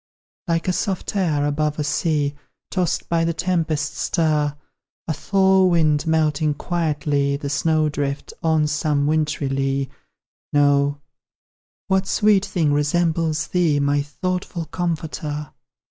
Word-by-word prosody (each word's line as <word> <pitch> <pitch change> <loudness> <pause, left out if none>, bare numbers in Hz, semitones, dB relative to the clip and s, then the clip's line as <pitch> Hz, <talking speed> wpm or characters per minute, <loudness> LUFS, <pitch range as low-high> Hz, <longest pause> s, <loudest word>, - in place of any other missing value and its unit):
Like 165 0 0
a 185 - +2
soft, 195 +2 -2
air 155 -7 +1
above 150 +1 0
a 150 - -1
sea, 150 -1 0 0.4
Tossed 180 -3 -1
by 165 -1 +1
the 165 0 0
tempest's 160 -4 -1
stir; 150 -4 +1 0.5
A 160 - 0
thaw 190 +3 +3
wind, 160 -3 +2
melting 155 -2 +1
quietly 145 -4 0
The 140 -1 -4
snow 155 +1 +2
drift 145 -1 -3
on 160 -2 +2
some 150 -1 0
wintry 150 -1 0
lea; 135 0 -1 0.6
No: 145 0 +3 0.9
what 190 0 +1
sweet 205 -2 +3
thing 155 -5 +1
resembles 160 +1 +1
thee, 165 -5 +1
My 145 0 +2
thoughtful 180 +3 -3
Comforter? 155 -3 -3
155 Hz, 125 wpm, -22 LUFS, 145-170 Hz, 0.9 s, thaw